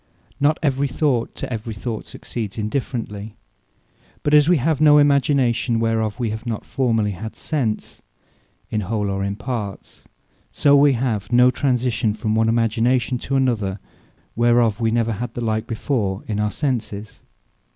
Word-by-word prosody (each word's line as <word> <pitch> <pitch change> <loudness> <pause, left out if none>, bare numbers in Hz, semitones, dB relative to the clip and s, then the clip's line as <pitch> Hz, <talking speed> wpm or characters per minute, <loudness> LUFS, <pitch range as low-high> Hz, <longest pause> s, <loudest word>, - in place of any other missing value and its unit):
Not 150 +2 +3
every 140 -1 +1
Thought 130 -3 0
to - - -5
every 110 0 -5
Thought 110 +1 -5
succeeds 110 -4 -6
indifferently. 110 -2 -4 0.9
But 145 - +1
as 150 +1 +6
wee 180 - +5
have 150 +2 0
no 150 -1 +7
Imagination, 140 -5 +3
whereof 110 -2 0
we 115 -3 -1
have 110 +1 -5
not 110 -2 -3
formerly 115 -5 0
had 110 +4 -7
Sense, 125 -9 -3 0.7
in 105 - 0
whole, 105 0 -2
or 95 0 -2
in 100 0 -2
parts; 110 -4 -6 0.5
so 145 -1 +4
we 140 0 +5
have 115 -5 -2
no 125 +1 +6
Transition 125 -5 0
from 110 0 -2
one 110 0 +2
Imagination 120 +2 +1
to 135 - -3
another, 115 -8 0 0.6
whereof 120 -2 +3
we 115 -1 +1
never 115 0 +1
had 120 +3 -5
the 120 - -3
like 110 -1 -1
before 110 -4 -2
in 105 -1 -3
our 105 0 0
Senses. 110 -5 -3
115 Hz, 155 wpm, -21 LUFS, 110-130 Hz, 0.9 s, no